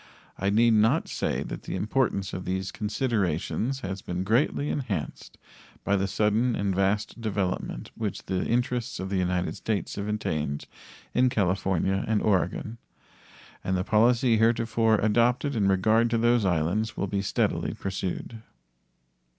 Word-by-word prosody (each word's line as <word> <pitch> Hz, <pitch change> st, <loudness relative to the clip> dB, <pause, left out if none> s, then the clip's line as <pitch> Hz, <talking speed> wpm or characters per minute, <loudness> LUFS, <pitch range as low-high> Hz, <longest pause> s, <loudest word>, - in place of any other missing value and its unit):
I 100 Hz, -, +1 dB
need 115 Hz, +3 st, +4 dB
not 110 Hz, +9 st, +3 dB
say -, -, -2 dB
that -, -, -6 dB
the -, -, -5 dB
importance 100 Hz, -1 st, 0 dB
of 90 Hz, -, -4 dB
these 95 Hz, +1 st, -2 dB
considerations 110 Hz, -, -1 dB
has 95 Hz, 0 st, -4 dB
been 90 Hz, +1 st, -3 dB
greatly 125 Hz, +7 st, +1 dB
enhanced 105 Hz, -, -4 dB, 0.5 s
by 100 Hz, -, +2 dB
the 95 Hz, 0 st, +1 dB
sudden 110 Hz, +5 st, +1 dB
and 100 Hz, -1 st, 0 dB
vast 100 Hz, +4 st, 0 dB
development 95 Hz, -, -2 dB
which -, -, -4 dB
the 95 Hz, -1 st, -1 dB
interests 120 Hz, 0 st, -1 dB
of 95 Hz, +1 st, -4 dB
the 100 Hz, -, +1 dB
United 90 Hz, 0 st, -1 dB
States 105 Hz, -6 st, -2 dB
have 100 Hz, 0 st, -3 dB
attained 80 Hz, -9 st, -2 dB, 0.5 s
in 125 Hz, +1 st, +4 dB
California 95 Hz, -3 st, 0 dB
and 110 Hz, -1 st, +2 dB
Oregon, 105 Hz, +3 st, 0 dB, 0.8 s
and 95 Hz, 0 st, 0 dB
the 90 Hz, -, 0 dB
policy 115 Hz, +3 st, +3 dB
heretofore 115 Hz, 0 st, +3 dB
adopted 120 Hz, +6 st, +2 dB
in 105 Hz, -3 st, +2 dB
regard 110 Hz, +5 st, +3 dB
to 115 Hz, -, +1 dB
those 120 Hz, -1 st, +3 dB
islands 90 Hz, +5 st, 0 dB
will -, -, 0 dB
be 100 Hz, 0 st, -1 dB
steadily 100 Hz, -, 0 dB
pursued. 95 Hz, +4 st, -4 dB
105 Hz, 145 wpm, -27 LUFS, 95-115 Hz, 0.8 s, need